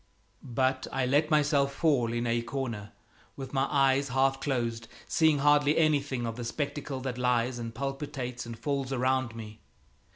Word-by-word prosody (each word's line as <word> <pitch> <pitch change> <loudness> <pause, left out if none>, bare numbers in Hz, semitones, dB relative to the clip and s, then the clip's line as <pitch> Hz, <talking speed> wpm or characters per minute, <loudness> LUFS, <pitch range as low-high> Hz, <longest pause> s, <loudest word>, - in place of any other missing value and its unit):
But 130 +1 0
I 135 -1 0
let 145 +4 +2
myself 145 -2 +2
fall 135 -8 +2
in 120 0 -1
a 120 0 +1
corner 115 -5 -4 0.4
with 135 -1 -8
my 135 0 +2
eyes 135 0 +3
half 135 +1 +2
closed, 115 -4 -2 0.2
seeing 160 -2 +3
hardly 145 +1 +4
anything 145 -6 +1
of 115 0 -4
the 120 - -4
spectacle 140 +2 -4
that 125 -1 -4
lies 125 0 +1
and 115 -1 -6
palpitates 135 -2 -4
and 115 -1 -7
falls 135 +2 -2
around 130 -2 0
me. 110 -1 -9
130 Hz, 160 wpm, -29 LUFS, 120-140 Hz, 0.4 s, hardly